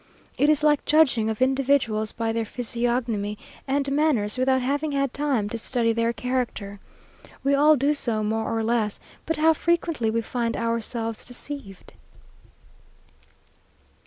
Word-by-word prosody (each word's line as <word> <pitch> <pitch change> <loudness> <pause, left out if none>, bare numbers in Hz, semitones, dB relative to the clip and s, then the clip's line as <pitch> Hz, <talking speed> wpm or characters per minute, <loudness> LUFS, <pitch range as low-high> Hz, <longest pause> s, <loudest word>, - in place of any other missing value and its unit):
It 290 - +3
is 305 -1 +3
like 295 -1 +3
judging 270 -8 +3
of 220 +3 0
individuals 260 -5 +1
by 225 -1 -2
their 230 0 -1
physiognomy 235 -3 -2 0.3
and 275 0 0
manners, 275 -8 +1
without 260 +1 +2
having 285 +3 -1
had 275 -2 0
time 275 -8 0
to 230 - -4
study 230 -1 0
their 230 0 +1
character. 235 -5 -3 0.6
We 275 +1 +2
all 300 +2 +6
do 285 +2 +2
so 230 -7 -1
more 220 +1 -1
or 225 - 0
less, 220 -2 0 0.3
but 325 -1 0
how 320 +1 +5
frequently 330 -7 0
we 230 +1 0
find 230 0 -2
ourselves 230 -1 -2
deceived! 245 -6 -9
245 Hz, 140 wpm, -24 LUFS, 225-280 Hz, 0.6 s, all